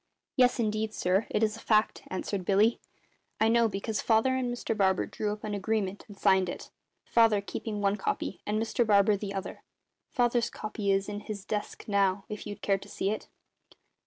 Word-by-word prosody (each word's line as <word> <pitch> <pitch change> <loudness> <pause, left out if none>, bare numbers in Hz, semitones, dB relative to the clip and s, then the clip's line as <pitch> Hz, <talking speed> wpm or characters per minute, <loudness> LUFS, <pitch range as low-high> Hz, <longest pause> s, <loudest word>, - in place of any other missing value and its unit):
"Yes, 250 -1 +4
indeed, 215 -1 -1
sir, 185 +4 +1
it 210 - +1
is 215 0 +1
a - - -10
fact," 215 -1 +2
answered 185 +1 -3
Billy. 205 +5 +3 0.6
"I 220 - +4
know, 235 0 +4
because 210 +1 -3
Father 230 +3 +3
and 255 -2 -1
Mr 240 -2 -2
Barber 190 -3 +2
drew 210 -1 -3
up 210 +1 -6
an 210 -1 -3
agreement 205 -1 -2
and 205 - -12
signed 190 -2 +3
it, - - -7 0.3
Father 225 -3 +4
keeping 210 +1 -5
one 200 0 +2
copy, 190 -1 -3
and 210 +1 -1
Mr 225 +2 +1
Barber 205 -1 +4
the 200 0 -5
other. 195 - -5 0.5
Father's 240 -3 +1
copy 215 -1 -4
is 195 0 +1
in 205 0 -4
his 205 -1 -7
desk 210 -1 -4
now, 195 -1 +2
if 210 - -6
you'd 205 - -8
care 195 -1 +2
to 200 +1 -13
see 195 - -1
it." 215 - -4
210 Hz, 190 wpm, -29 LUFS, 200-220 Hz, 0.6 s, Yes